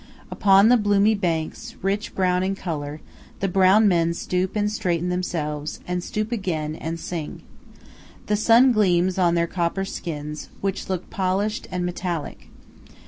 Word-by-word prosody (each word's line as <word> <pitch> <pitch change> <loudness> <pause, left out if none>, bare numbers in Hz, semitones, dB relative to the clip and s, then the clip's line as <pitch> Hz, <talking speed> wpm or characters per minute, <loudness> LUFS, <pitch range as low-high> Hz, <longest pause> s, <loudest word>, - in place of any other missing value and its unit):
Upon 200 +2 +5
the 250 - +6
bloomy 205 0 +3
banks, 170 -6 -3
rich 200 +2 -2
brown 180 -1 +2
in 190 +1 -1
color, 155 -5 -5 0.4
the 195 - 0
brown 195 +3 +5
men 170 -3 +2
stoop 185 +3 -2
and 210 0 +1
straighten 180 -4 -1
themselves, 155 -4 -3
and 180 0 -2
stoop 215 +4 -3
again, 165 -9 -2
and 165 +1 -5
sing. 165 -3 -6 0.8
The 210 - +1
sun 230 +5 +5
gleams 185 -4 +2
on 175 -2 +3
their 170 0 +2
copper 175 +2 -1
skins, 150 -5 -6
which 195 0 -3
look 185 -2 -4
polished 200 +5 -1
and 180 -1 -2
metallic. 175 -3 -4
185 Hz, 145 wpm, -23 LUFS, 170-200 Hz, 0.8 s, the